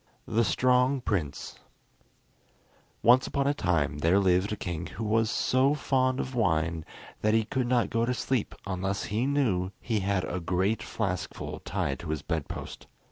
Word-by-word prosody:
] - - -39
The 115 - +5
Strong 125 +6 +2
Prince 80 - -3 1.4
Once 125 +3 +6
upon 140 -1 0
a 140 - +3
time 80 - 0
there 85 +5 +3
lived 95 0 +3
a - - 0
king 85 -4 -4
who 115 - -6
was 110 +1 +2
so 130 +3 +2
fond 130 -2 +1
of 130 - -3
wine 80 -8 0 0.4
that 110 +1 +3
he 110 -1 +2
could 125 +2 -1
not 120 -1 +2
go 115 0 +1
to 125 - +1
sleep 130 -4 -1
unless 95 +1 -2
he 115 +5 +1
knew 115 -11 +1
he 110 -3 -1
had 100 -1 0
a 90 - -3
great 95 +5 0
flaskful 100 -5 -4
tied - - -2
to 85 - -7
his 80 -2 -2
bed 80 -3 -2
post. - - -7
105 Hz, 175 wpm, -28 LUFS, 90-125 Hz, 1.4 s, Once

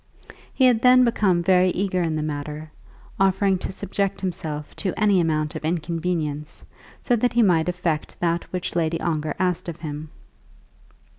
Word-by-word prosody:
He 260 - +2
had 240 -3 +4
then 255 0 +6
become 190 -7 +2
very 185 0 +4
eager 185 0 -1
in 165 -2 0
the 155 - -2
matter, 150 +1 -5 0.5
offering 195 0 +2
to - - -4
subject 200 0 -2
himself 155 -5 -4
to 190 -4 -3
any 200 -3 +4
amount 155 -2 0
of - - -5
inconvenience 160 -2 -3 0.4
so 245 - +2
that 245 +1 +1
he 235 0 +4
might 175 -4 +3
effect 170 -3 -3
that 170 0 -1
which 180 -2 -4
Lady 165 -1 0
Ongar 155 -2 -2
asked 180 -2 -1
of 165 -1 -8
him. 150 -1 -6
175 Hz, 160 wpm, -23 LUFS, 155-195 Hz, 0.5 s, then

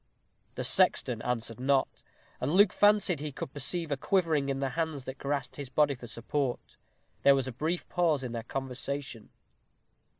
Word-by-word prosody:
The - - -3
sexton 115 -3 +2
answered 115 -1 -3
not, 135 +1 +1 0.4
and 130 - -1
Luke 200 +1 +6
fancied 205 -6 +4
he 150 0 -4
could 130 - -7
perceive 160 +3 -1
a 140 - +1
quivering 160 -5 +1
in 135 0 -1
the 135 -1 0
hands 160 -3 -3
that 130 0 -7
grasped 140 -2 -3
his 140 -3 -6
body 145 +2 +3
for 120 -2 -10
support. 120 +3 -3 0.5
There 140 - +6
was 135 -2 -1
a - - -3
brief 160 +8 -2
pause 165 -6 +1
in 125 - -4
their 115 -1 -3
conversation. 130 0 -5
140 Hz, 170 wpm, -30 LUFS, 130-155 Hz, 0.5 s, Luke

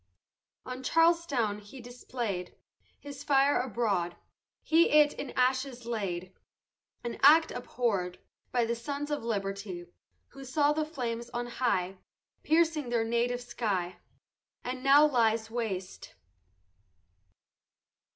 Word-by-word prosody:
On 255 0 -6
Charlestown 290 -9 +2
he 210 +6 -12
display'd 235 -6 -5 0.4
His 285 -1 -9
fire 280 0 +3
abroad; 205 -8 -1 0.5
He 330 +2 +4
it 300 0 +5
in 280 - -6
ashes 255 -1 0
laid, 190 -6 -3 0.7
An 240 -1 -5
act 315 +4 +7
abhorr'd 210 -8 -2 0.3
By 240 -2 +2
sons 285 +5 -4
of 295 -5 -2
liberty, 195 -4 -4 0.4
Who 275 - -11
saw 285 +3 +2
the 310 0 -1
flames 240 -6 -4
on 240 0 -1
high 195 -7 -1 0.4
Piercing 320 -4 +2
their 235 -2 +1
native 240 +2 0
sky, 205 -7 -2 0.7
And 255 +1 -4
now 280 +2 +7
lies 225 -5 +1
waste. 200 -6 -5
240 Hz, 110 wpm, -30 LUFS, 215-280 Hz, 0.7 s, act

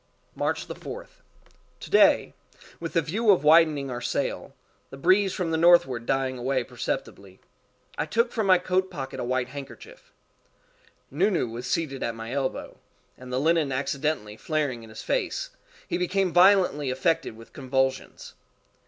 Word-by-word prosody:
March - - -2
4th. - - -9 0.6
To - - -10
day, - - +4 0.5
with 165 -1 -6
the 165 - +2
view 210 +9 -1
of 185 -8 +5
widening 150 -3 +4
our 120 0 -5
sail, - - -3 0.3
the 135 - -10
breeze 190 +6 +3
from 175 -3 -3
the 160 - +1
northward 165 -8 +4
dying 130 -1 -1
away 130 +1 0
perceptibly, 100 -4 -6 0.6
I 150 - -1
took 230 +9 +1
from 220 -4 -1
my 185 -1 +7
coat 185 +1 0
pocket 135 -6 -6
a - - -2
white 130 0 -1
handkerchief. 445 - -11 1.0
Nu - - +2
Nu 175 - 0
was 120 +2 -7
seated 135 -1 -2
at 115 -1 -2
my 115 +1 -7
elbow, 135 -1 -3 0.4
and 125 0 -11
the 125 - 0
linen 160 -1 +2
accidentally 135 -4 -2
flaring 145 -6 -2
in 115 - -13
his 110 - -9
face, - - -2 0.4
he - - -2
became 180 0 0
violently 180 -6 +4
affected 130 -3 -1
with 115 - -15
convulsions. 130 -1 -2
145 Hz, 155 wpm, -26 LUFS, 130-180 Hz, 1.0 s, my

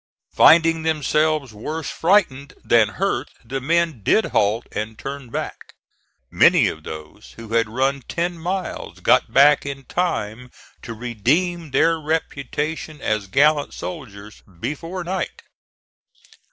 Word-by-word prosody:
Finding 165 0 +6
themselves 155 -3 0
worse 150 +9 -5
frightened 160 -7 +1
than 115 -3 +4
hurt 195 +2 -1 0.2
the 135 +3 -4
men 165 -3 0
did 220 - +3
halt 105 +3 +1
and 110 +1 -5
turn 135 -1 -7
back. - - -6 0.6
Many - - +5
of 80 - -8
those 80 +6 -10
who 115 -1 -10
had 115 -1 +2
run 135 +4 0
ten 175 +1 -2
miles 180 +3 -5
got - - +3
back 145 +2 +5
in 140 -1 -6
time 125 -9 -2 0.3
to 115 -1 -7
redeem 145 - -1
their 165 +4 +2
reputation 155 0 -3
as 105 -5 -1
gallant 145 +7 +2
soldiers 105 - -8 0.2
before 165 - -4
night. 185 +2 -4
140 Hz, 125 wpm, -21 LUFS, 115-165 Hz, 0.6 s, Finding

